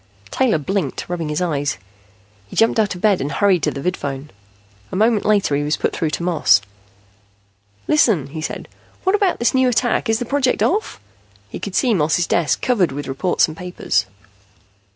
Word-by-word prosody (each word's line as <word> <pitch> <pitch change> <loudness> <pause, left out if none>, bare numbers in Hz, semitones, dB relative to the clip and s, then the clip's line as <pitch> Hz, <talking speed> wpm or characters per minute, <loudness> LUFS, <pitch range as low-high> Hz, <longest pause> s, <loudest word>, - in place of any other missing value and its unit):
Taylor 250 -10 +2
blinked, 155 -1 -3
rubbing 170 -3 -3
his 150 +4 -1
eyes. 145 -4 -1 0.7
He - - -11
jumped 225 0 +3
out 205 -3 +1
of 180 - -10
bed 205 -4 +3
and 140 +2 -3
hurried 190 0 +2
to - - +1
the 140 - -6
vidphone. 145 -5 -3 0.6
A - - -4
moment 215 +1 +2
later 200 -8 +2
he 145 - 0
was 150 +1 0
put - - -1
through 160 - -1
to 165 - -4
Moss. 175 -2 +4 1.3
"Listen," 225 - +3
he 155 +3 -7
said. - - -5 0.4
"What 380 - +2
about 405 -3 +2
this 235 - +1
new 260 -1 +3
attack? 240 -1 0
Is 225 - +3
the 245 - -4
project 265 0 +1
off?" 425 +5 0 0.5
He - - -7
could - - -6
see 255 -9 +3
Moss's 165 -1 +1
desk, 165 -2 0
covered 200 - +2
with 145 +2 -5
reports 135 +7 +1
and 155 - -8
papers. 165 - -1
180 Hz, 185 wpm, -20 LUFS, 150-230 Hz, 1.3 s, Moss